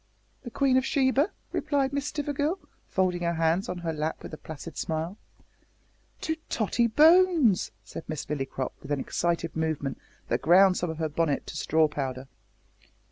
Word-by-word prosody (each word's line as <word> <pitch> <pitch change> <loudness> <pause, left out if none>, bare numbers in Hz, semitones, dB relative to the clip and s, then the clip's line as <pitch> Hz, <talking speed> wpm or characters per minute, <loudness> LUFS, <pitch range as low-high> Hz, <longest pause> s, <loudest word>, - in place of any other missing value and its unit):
"The 245 - -7
Queen 265 +1 +2
of 260 - +3
Sheba," 270 +5 +2 0.2
replied 280 -3 0
Miss 285 0 -1
Stivergill, 295 +4 -1 0.3
folding 185 -2 0
her 170 0 0
hands 165 +3 +1
on 180 - -3
her 165 - 0
lap 155 +1 -3
with - - -8
a - - -5
placid 160 +1 -9
smile. 160 +3 -3 1.1
"To 320 0 -1
Tottie 235 +2 +1
Bones!" 315 - +5
said - - -8
Miss 155 -2 -4
Lillycrop, 135 -3 -3
with - - -11
an 145 - +1
excited 170 +3 -1
movement 155 -3 -2 0.3
that - - 0
ground 185 +3 +6
some 175 - -1
of 160 - -4
her 160 -1 0
bonnet 150 -1 0
to - - -8
straw 155 +1 +3
powder. 135 -3 -4
175 Hz, 165 wpm, -27 LUFS, -, 1.1 s, ground